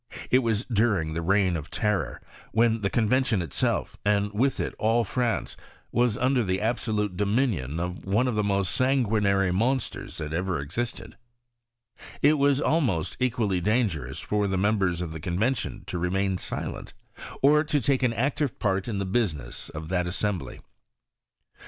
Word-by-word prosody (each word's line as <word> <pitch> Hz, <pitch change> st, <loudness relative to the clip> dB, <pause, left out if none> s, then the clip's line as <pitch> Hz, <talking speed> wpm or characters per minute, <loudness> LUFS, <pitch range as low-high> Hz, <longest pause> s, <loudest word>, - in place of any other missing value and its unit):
It 130 Hz, -, +6 dB
was 115 Hz, -2 st, 0 dB
during 105 Hz, -9 st, +1 dB
the 85 Hz, -, -2 dB
reign 95 Hz, +1 st, +2 dB
of 75 Hz, -2 st, -5 dB
terror, 100 Hz, -, -1 dB, 0.3 s
when 115 Hz, 0 st, +3 dB
the 100 Hz, -, +1 dB
Convention 120 Hz, 0 st, +2 dB
it 80 Hz, -, -8 dB
self, -, -, 0 dB
and 105 Hz, 0 st, +1 dB
with 130 Hz, +5 st, +1 dB
it -, -, -2 dB
all 115 Hz, +2 st, +3 dB
France, 120 Hz, +1 st, -1 dB, 0.4 s
was 120 Hz, -3 st, +2 dB
under 130 Hz, 0 st, +2 dB
the 95 Hz, -2 st, 0 dB
absolute 110 Hz, -3 st, -1 dB
dominion 100 Hz, -, 0 dB
of 90 Hz, +1 st, -4 dB
one 105 Hz, +7 st, +1 dB
of 125 Hz, -, 0 dB
the 105 Hz, 0 st, +1 dB
most 100 Hz, -2 st, +1 dB
sanguinary 110 Hz, -7 st, +2 dB
monsters 125 Hz, +8 st, -1 dB
that 75 Hz, 0 st, -5 dB
ever 90 Hz, -1 st, -1 dB
existed: 85 Hz, +13 st, -5 dB, 1.1 s
it 150 Hz, +1 st, +5 dB
was 140 Hz, -1 st, +3 dB
almost 125 Hz, -, +1 dB
equally 110 Hz, -7 st, +1 dB
dangerous 105 Hz, -5 st, 0 dB
for 105 Hz, -1 st, 0 dB
the 95 Hz, -1 st, 0 dB
members 95 Hz, -3 st, +1 dB
of 85 Hz, -3 st, -4 dB
the 80 Hz, -, -6 dB
Convention 110 Hz, -, -1 dB
to 90 Hz, -, -4 dB
remain 95 Hz, +1 st, 0 dB
silent, -, -, -5 dB, 0.5 s
or 150 Hz, +2 st, +6 dB
to 150 Hz, -1 st, +1 dB
take 135 Hz, +1 st, +1 dB
an 125 Hz, -2 st, +3 dB
active 140 Hz, +3 st, -1 dB
part 95 Hz, -2 st, 0 dB
in 110 Hz, -4 st, -2 dB
the 100 Hz, -, -1 dB
business 85 Hz, -, -2 dB
of 80 Hz, +1 st, -7 dB
that 90 Hz, -1 st, 0 dB
assem 100 Hz, +1 st, -1 dB
bly. -, -, -9 dB
105 Hz, 165 wpm, -26 LUFS, 90-120 Hz, 1.1 s, It